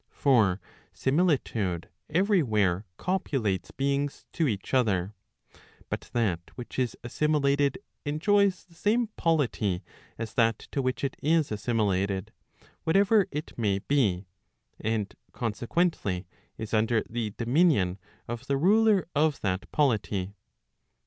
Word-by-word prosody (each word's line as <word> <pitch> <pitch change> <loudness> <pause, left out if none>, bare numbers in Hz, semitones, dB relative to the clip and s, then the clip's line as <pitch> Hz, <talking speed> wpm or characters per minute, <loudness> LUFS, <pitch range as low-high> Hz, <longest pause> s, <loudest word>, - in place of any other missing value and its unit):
For 110 -9 +3 0.3
similitude 130 - 0 0.2
every 190 +4 +3
where 105 - +1
copulates 120 - -1
* - - -50
beings 140 +1 -1
to 165 - +1
each 105 -1 -3
other; 105 -6 +2 0.8
but - - -4
that 105 -8 +1 0.2
which 125 +1 -6
is 125 -2 -1
assimilated 145 +3 +1 0.3
enjoys 190 +6 +2
the 170 - -22
same 215 +6 +1
polity 125 - +1 0.3
as 115 -1 -5
that 115 -2 +3
to 140 - 0
which 130 +1 -2
it 135 - -1
is 160 -2 +2
assimilated, 100 -3 0 0.5
whatever 200 +4 +4
it 150 +2 -6
may 100 -4 +2
be, 100 -6 +1 0.5
and 110 -2 -1 0.2
consequently, 115 - -1 0.3
is 110 0 -6
under 110 +1 +2
the 110 -3 -3
dominion 120 - +2 0.3
of 120 +3 -6
the 140 - +1
ruler 205 +3 +4
of 150 0 +2
that 95 0 -2
polity. 105 -8 0
125 Hz, 120 wpm, -28 LUFS, 105-155 Hz, 0.8 s, whatever